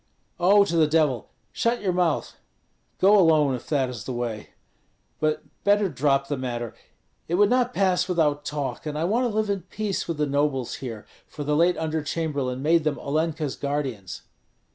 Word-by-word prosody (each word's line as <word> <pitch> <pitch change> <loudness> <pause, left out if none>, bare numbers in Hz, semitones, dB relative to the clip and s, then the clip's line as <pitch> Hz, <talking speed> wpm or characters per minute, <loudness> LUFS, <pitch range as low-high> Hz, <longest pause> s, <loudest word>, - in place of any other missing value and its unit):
"Oh, 200 +3 +5
to 170 - -2
the 155 -2 +5
Devil! 150 -7 +1 0.2
Shut 235 +1 0
your 185 -2 +1
mouth! 175 -3 0 0.6
Go 200 +2 +6
alone, 155 -6 +4
if 125 - -6
that 140 -4 +1
is 120 -5 -7
the - - -4
way; 120 -3 -4 0.7
but 155 0 0 0.2
better 205 -1 +3
drop 140 -1 +1
the 145 0 -2
matter. 120 -3 -4 0.5
It 170 - 0
would 205 +3 +4
not 250 -1 +2
pass 185 -5 +1
without 150 -5 +1
talk, 145 +1 -4
and 150 0 -3
I 155 - -1
want 225 +8 +1
to 215 - -5
live 215 -1 +1
in 200 -2 -2
peace 195 +3 -3
with 165 -2 -3
the 150 - +1
nobles 140 -3 -1
here, 115 -5 -7 0.2
for 150 - -7
the 150 +1 0
late 170 +3 +3
under 160 0 -1
chamberlain 140 -4 -2
made 165 +1 +3
them 150 -2 0
Olenka's 155 0 -2
guardians." 135 -9 -4
155 Hz, 185 wpm, -25 LUFS, 140-180 Hz, 0.7 s, Go